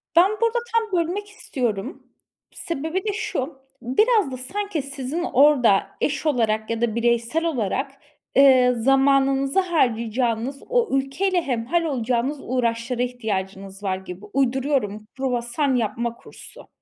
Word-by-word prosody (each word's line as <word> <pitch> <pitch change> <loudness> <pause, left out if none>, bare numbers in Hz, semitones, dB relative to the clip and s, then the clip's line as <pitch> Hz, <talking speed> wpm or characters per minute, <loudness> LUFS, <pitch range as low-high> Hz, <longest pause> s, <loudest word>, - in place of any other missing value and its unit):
Ben 360 +4 +6
burada 460 +1 +2
tam 440 -6 +1
bölmek 365 +5 -2
istiyorum. 250 - -4 0.5
Sebebi 335 +3 -3
de 420 - 0
şu: 390 -10 -3 0.3
Biraz 410 - +2
da 255 - -5
sanki 355 +6 -3
sizin 275 +4 -4
orada 265 - +4
eş 285 +1 -1
olarak 220 -7 +1
ya 230 0 -2
da 235 -2 0
bireysel 235 +7 +1
olarak, 270 - -1 0.4
eee, 255 -2 +6
zamanınızı 270 +4 +3
harcayacağınız 245 - 0
o 485 -3 +2
ülkeyle 350 +8 0
hemhâl 265 +4 -1
olacağınız 255 -1 -1
uğraşlara 240 0 -1
ihtiyacınız 195 -5 -4
var 190 -2 -1
gibi. 190 +1 -9
Uyduruyorum, 260 -5 0
kruvasan 260 +1 0
yapma 235 0 -1
kursu. - - -13
265 Hz, 120 wpm, -23 LUFS, 235-320 Hz, 0.5 s, Ben